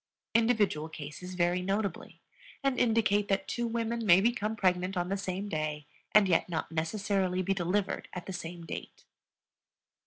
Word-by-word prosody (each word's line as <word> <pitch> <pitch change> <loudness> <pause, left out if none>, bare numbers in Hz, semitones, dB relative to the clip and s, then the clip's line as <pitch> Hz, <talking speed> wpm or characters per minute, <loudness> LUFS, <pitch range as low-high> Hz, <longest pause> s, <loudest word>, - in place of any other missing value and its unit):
Individual 215 -9 +2
cases 160 +4 -8
vary 175 0 +2
notably, 195 +2 -2 0.4
and 275 -2 +1
indicate 220 -3 +3
that 195 -1 0
two 240 -1 -1
women 230 0 -1
may 185 -3 +7
become 220 0 +1
pregnant 185 -1 +1
on 175 0 -1
the 195 - +1
same 195 0 -3
day 155 -4 -3 0.3
and 210 -2 +6
yet 175 0 +2
not 165 -1 -3
necessarily 185 +2 0
be 195 - +1
delivered 195 +2 -1
at 180 -1 -6
the 190 - -5
same 175 -1 -6
date. - - -8
190 Hz, 155 wpm, -30 LUFS, 175-210 Hz, 0.4 s, may